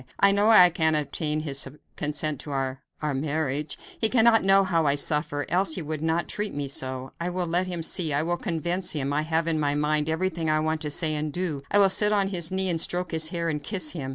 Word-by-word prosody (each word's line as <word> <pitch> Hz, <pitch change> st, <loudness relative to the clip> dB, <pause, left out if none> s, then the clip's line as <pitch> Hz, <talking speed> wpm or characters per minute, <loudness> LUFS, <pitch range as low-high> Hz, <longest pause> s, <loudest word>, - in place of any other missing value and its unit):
I 200 Hz, -, +5 dB
know 205 Hz, +2 st, +2 dB
I 180 Hz, -5 st, +8 dB
can 160 Hz, -2 st, +1 dB
obtain 150 Hz, +1 st, -2 dB
his 140 Hz, -3 st, -2 dB, 0.3 s
consent 150 Hz, -1 st, -2 dB
to -, -, -6 dB
our 135 Hz, -1 st, -3 dB, 0.2 s
our 150 Hz, -2 st, -1 dB
marriage. 145 Hz, +1 st, -2 dB, 0.2 s
He 220 Hz, -, +4 dB
cannot 230 Hz, -1 st, +4 dB
know 195 Hz, 0 st, +5 dB
how 165 Hz, -5 st, 0 dB
I 140 Hz, -, +3 dB
suffer, 145 Hz, 0 st, 0 dB
else 180 Hz, -1 st, +1 dB
he 180 Hz, -, -4 dB
would 155 Hz, 0 st, -5 dB
not 160 Hz, +1 st, -1 dB
treat 210 Hz, -4 st, -3 dB
me 145 Hz, -1 st, -3 dB
so. 130 Hz, -1 st, -2 dB
I 175 Hz, -, -2 dB
will 180 Hz, 0 st, -3 dB
let 175 Hz, +2 st, 0 dB
him 175 Hz, -2 st, -4 dB
see 165 Hz, -1 st, -1 dB
I 145 Hz, +2 st, 0 dB
will 175 Hz, +1 st, -1 dB
convince 175 Hz, 0 st, 0 dB
him. 140 Hz, -2 st, -2 dB
I 150 Hz, -, +1 dB
have 160 Hz, +1 st, -1 dB
in 160 Hz, -2 st, 0 dB
my 145 Hz, -1 st, 0 dB
mind 150 Hz, +1 st, 0 dB
everything 160 Hz, -1 st, -2 dB
I 155 Hz, 0 st, +2 dB
want 155 Hz, 0 st, -2 dB
to 150 Hz, -, -3 dB
say 155 Hz, +1 st, -1 dB
and 150 Hz, 0 st, -2 dB
do. 165 Hz, -4 st, -3 dB
I -, -, +3 dB
will 195 Hz, -2 st, +5 dB
sit 210 Hz, +2 st, +3 dB
on 200 Hz, -2 st, +1 dB
his 170 Hz, -4 st, +1 dB
knee 190 Hz, 0 st, 0 dB
and 165 Hz, -2 st, 0 dB
stroke 180 Hz, +1 st, -2 dB
his 160 Hz, -1 st, +3 dB
hair 170 Hz, 0 st, -3 dB
and 150 Hz, -2 st, -2 dB
kiss 170 Hz, -2 st, 0 dB
him." 140 Hz, -6 st, -6 dB
160 Hz, 245 wpm, -25 LUFS, 150-180 Hz, 0.3 s, I